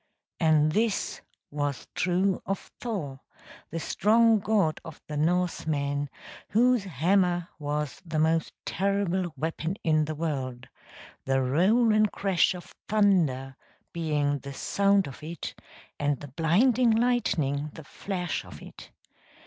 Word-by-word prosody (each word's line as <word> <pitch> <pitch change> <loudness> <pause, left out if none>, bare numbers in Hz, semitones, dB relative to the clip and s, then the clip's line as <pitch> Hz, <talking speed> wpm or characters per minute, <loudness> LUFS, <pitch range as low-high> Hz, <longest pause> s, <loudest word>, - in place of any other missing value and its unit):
And 155 -2 +4
this 215 +3 0 0.3
was 145 -2 -3
true 185 +1 +1
of 195 - -4
Thor, 165 - -4 0.5
the 165 - -4
strong 225 +5 +3
god 200 -6 +1
of - - -10
the 150 - -5
Norsemen 150 -3 0 0.4
whose 240 0 +3
hammer 175 +1 +1
was 150 -1 -3
the 165 -3 -4
most 160 +1 +2
terrible 190 -2 0
weapon 160 +4 -2
in 155 -1 +3
the 155 +1 -4
world, 130 -6 -3 0.6
the 135 0 +2
roll 200 - +3
and 215 -1 +3
crash 190 -2 +2
of 175 - -11 0.2
thunder 170 -11 +2 0.4
being 150 -4 0
the 140 +1 -8
sound 200 +5 +2
of 135 - -9
it 165 +3 -6 0.5
and 145 -2 0
the 145 - -9
blinding 210 - +3
lightning 190 - +1
the 160 - -10
flash 180 +2 -4
of - - -11
it. - - -12
165 Hz, 125 wpm, -27 LUFS, 145-200 Hz, 0.6 s, And